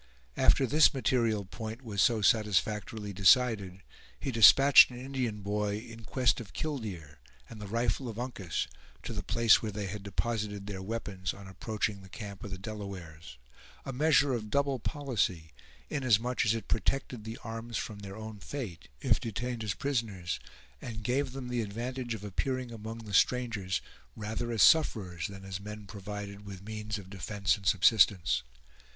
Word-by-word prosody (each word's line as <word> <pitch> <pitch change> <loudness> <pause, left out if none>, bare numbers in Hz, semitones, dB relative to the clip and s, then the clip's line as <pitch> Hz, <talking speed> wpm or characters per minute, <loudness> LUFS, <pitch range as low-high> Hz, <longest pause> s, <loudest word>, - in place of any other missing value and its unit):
After 135 - +4
this 150 +3 +5
material 115 -5 +1
point 110 +5 -7
was 105 -4 -1
so 115 -3 +3
satisfactorily 105 0 +1
decided, 100 -2 +3 0.4
he 135 - -2
despatched 135 +5 +9
an 125 - -9
Indian 125 -5 -3
boy 105 0 -1
in 115 0 -10
quest 125 0 +2
of 105 - -11
"killdeer" 95 - -5 0.3
and 110 -2 -10
the 105 - -6
rifle 115 +3 0
of 110 - -7
Uncas, 115 - -3 0.4
to - - -5
the - - -3
place 115 -1 +4
where 110 - -3
they 105 0 -4
had 100 +2 -5
deposited 105 0 -2
their 100 -2 -5
weapons 95 -3 -4
on 100 -1 -11
approaching 105 +1 -3
the 95 - -14
camp 100 0 -8
of 100 - -5
the 95 - -5
Delawares; 90 - -8 0.5
a 135 - -4
measure 145 0 +4
of 110 -3 -3
double 140 +1 +1
policy, 110 - -1 0.4
inasmuch 125 -3 +1
as 110 - +3
it 115 - -5
protected 120 +1 -1
the 110 +1 -6
arms 115 0 -5
from 105 -2 -5
their 100 -1 -8
own 110 -1 -8
fate, 110 - -6
if - - +3
detained 120 +1 -3
as 105 -2 -2
prisoners, 110 -11 -2 0.4
and 110 -2 -6
gave 130 +4 0
them 130 -1 -6
the 125 -1 -1
advantage 120 +3 -4
of 105 - -9
appearing 125 +5 -2
among 115 0 -7
the 105 - -8
strangers 110 -5 +2 0.3
rather 110 +2 -3
as 110 -5 +4
sufferers 95 - +3
than 95 -1 -10
as 95 -1 -5
men 105 +1 -8
provided 100 0 -7
with 100 -2 -9
means 105 0 -4
of 100 -3 -10
defense 100 0 0
and 100 -2 -7
subsistence. 95 -3 +4
110 Hz, 165 wpm, -31 LUFS, 100-120 Hz, 0.5 s, despatched